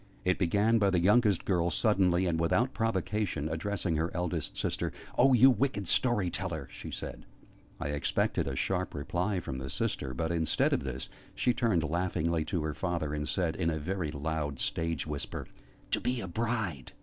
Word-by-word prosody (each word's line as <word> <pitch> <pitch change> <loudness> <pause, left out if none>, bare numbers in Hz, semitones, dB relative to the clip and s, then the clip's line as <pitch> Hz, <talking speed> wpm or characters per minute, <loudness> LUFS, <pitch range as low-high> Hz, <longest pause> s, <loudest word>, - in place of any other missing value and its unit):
It 90 0 +2
began 105 +5 +3
by 100 -2 +4
the 90 -2 +2
youngest 105 0 +4
girl 85 -3 +2
suddenly, 95 -1 +3
and 85 -2 0
without 120 +10 +2
provocation, 105 -7 -1
addressing 85 +1 -1
her 80 +2 0
eldest 90 -3 -2
sister. - - -1 0.2
"Oh, 135 +1 +5
you 130 +2 +8
wicked 120 -5 0
story 105 -7 +2
teller!" 80 -8 -2
she - - -8
said. - - -6 0.6
I - - -3
expected 75 -1 0
a 70 - -2
sharp 90 +5 -1
reply 90 +7 -1
from 65 -6 -5
the 65 +1 -5
sister; 65 -1 -2
but, 80 +4 -1
instead 80 -2 +2
of - - 0
this, - - -4 0.3
she 125 - +2
turned 115 -8 +2
laughingly 85 0 0
to 85 -4 -1
her 75 -1 -2
father, 85 -2 -2
and 75 0 -2
said, 90 -4 0
in 85 -3 0
a 80 - -1
very 85 +1 -2
loud 75 -1 -2
stage 80 +2 -1
whisper, 75 -2 -4 0.5
"To - - +2
be 125 0 0
a 95 - -4
bride!" 100 - -2
85 Hz, 180 wpm, -30 LUFS, 80-100 Hz, 0.6 s, you